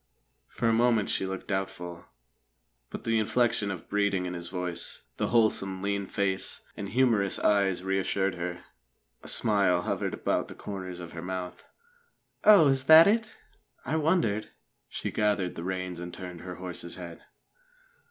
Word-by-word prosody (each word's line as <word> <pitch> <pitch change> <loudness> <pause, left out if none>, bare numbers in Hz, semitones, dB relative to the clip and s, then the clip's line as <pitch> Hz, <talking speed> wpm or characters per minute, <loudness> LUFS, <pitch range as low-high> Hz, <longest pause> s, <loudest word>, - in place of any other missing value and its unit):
For 120 - -2
a 115 - +4
moment 115 -2 +3
she 95 - 0
looked 95 0 -6
doubtful; 95 -3 -4 0.8
but - - -7
the 115 -1 +1
inflection 115 -1 +1
of 95 -4 -6
breeding 100 -2 +1
in 90 - -4
his 85 -1 -5
voice, 90 -1 -4
the - - 0
wholesome, 95 -5 +1
lean 100 -1 -1
face 95 -1 -2
and 100 - -5
humorous 115 -5 +2
eyes, 95 -3 +2
reassured 95 0 0
her. 85 0 -5 0.6
A - - -12
smile 100 -5 +2
hovered - - -2
about - - -1
the - - -10
corners 95 -3 -6
of 85 -1 -8
her 80 - -7
mouth. 90 0 -5 0.8
"Oh, 205 -8 +8
is 135 -1 +2
that 160 +2 +10
it? 220 +2 +1 0.5
I - - -1
wondered 155 - +1 0.2
..." - - -51
She - - -4
gathered 105 -4 0
the 85 - -7
reins 90 -1 -3
and 85 0 -6
turned 90 -1 -8
her 90 -1 -7
horse's 90 -1 -7
head. 85 -2 -9
95 Hz, 160 wpm, -28 LUFS, 90-110 Hz, 0.8 s, that